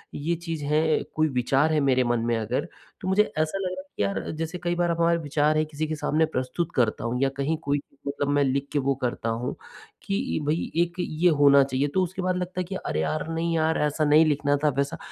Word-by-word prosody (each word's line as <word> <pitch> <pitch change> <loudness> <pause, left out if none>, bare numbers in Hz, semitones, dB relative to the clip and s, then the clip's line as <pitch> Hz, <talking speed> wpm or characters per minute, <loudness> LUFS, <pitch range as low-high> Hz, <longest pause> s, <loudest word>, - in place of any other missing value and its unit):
ये 165 +4 -1
चीज़ 165 -2 -5
है, 155 +2 +2
कोई 155 0 +2
विचार 135 +4 +2
है 155 - +3
मेरे 130 -3 +3
मन 120 -1 +1
में 120 -1 +1
अगर, 115 +3 -2 0.3
तो - - -5
मुझे 190 +3 +4
ऐसा 155 +4 0
लगा 185 -1 -3 0.2
कि - - +1
यार 100 -1 -2
जैसे 165 +2 -3
कई 175 0 0
बार 175 0 +1
अपना 170 0 +2
विचार 150 +1 +1
है 155 - +3
किसी 155 0 -4
के 155 - -2
सामने 155 +1 +1
प्रस्तुत 155 +3 -3
करता 115 -4 +1
हूँ 120 +2 -1
या 135 - +3
कहीं 145 +4 0
कोई, 140 0 0 0.3
मतलब 140 0 -2
मैं 145 0 +3
लिख 135 +1 0
के 145 - +2
वो 140 0 +1
करता 120 -2 -2
हूँ 115 +2 -2 0.5
कि 195 -4 -1
भई 155 +3 -1
एक 175 0 -5
ये 175 0 +2
होना 140 -1 +7
चाहिए 135 +1 0
तो 190 - +3
उसके 185 +2 -4
बाद 185 0 0
लगता 180 0 -4
है - - -1
कि, 185 +2 -6
अरे 75 - -3
यार, 80 - -2
नहीं 165 +1 -1
यार, 160 0 +2
ऐसा 150 +1 +1
नहीं 150 +2 +6
लिखना 145 -1 +1
था 150 - +5
वैसा। 140 0 0
150 Hz, 235 wpm, -25 LUFS, 135-165 Hz, 0.5 s, होना